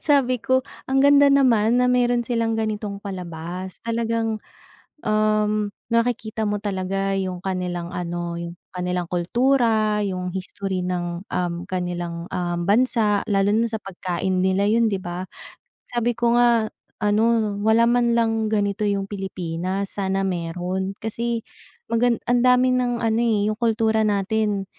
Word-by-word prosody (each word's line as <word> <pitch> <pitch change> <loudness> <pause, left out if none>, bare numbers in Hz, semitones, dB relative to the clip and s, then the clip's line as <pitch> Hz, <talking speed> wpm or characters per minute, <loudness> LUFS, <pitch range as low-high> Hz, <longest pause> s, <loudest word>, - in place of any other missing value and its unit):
Sabi 270 -4 +3
ko, 260 +1 +2 0.3
"Ang 265 0 +3
ganda 285 0 +7
naman 245 -4 +4
na - - +3
meron 245 -1 +2
silang 230 -1 0
ganitong 210 -2 -3
palabas. 180 -1 -6
Talagang, 230 -1 -1 0.7
um, 215 0 +1 0.2
nakikita 230 -2 0
mo 205 0 0
talaga 195 -1 -1
'yung 185 -2 -2
kanilang 180 -2 -3
ano, 175 -1 -3
'yung 170 0 -5 0.2
kanilang 180 -1 -2
kultura, 220 +2 +2
'yung 180 -1 -3
history 190 0 -3
ng, 175 0 -3
um, 175 -1 -1
kanilang, 175 -2 -3
um, 175 -1 -2
bansa 210 -1 +3
lalo 195 0 +2
na 230 +2 +3
sa 220 - -2
pagkain 185 0 -2
nila," 190 +2 +2
'yun, 230 +1 +3
'di 195 - -1
ba? 175 +1 -5 0.6
Sabi 240 -1 -1
ko 235 0 +2
nga, 235 -2 +4 0.4
ano, 215 0 +2
wala 220 +2 +4
man 235 0 +3
lang 225 -1 +1
ganito 205 -1 0
yung 200 -1 0
Pilipinas. 190 -1 -4
Sana 195 0 0
meron 180 +2 -3
kasi 230 +1 -3 0.5
magan 235 0 +3
ang 245 0 +2
dami 250 +1 +4
ng 245 -1 +1
ano, 225 +1 +2
eh, 220 -4 +2
'yung 215 - -4
kultura 220 -1 +2
natin, 205 0 0
210 Hz, 140 wpm, -23 LUFS, 185-230 Hz, 0.7 s, ganda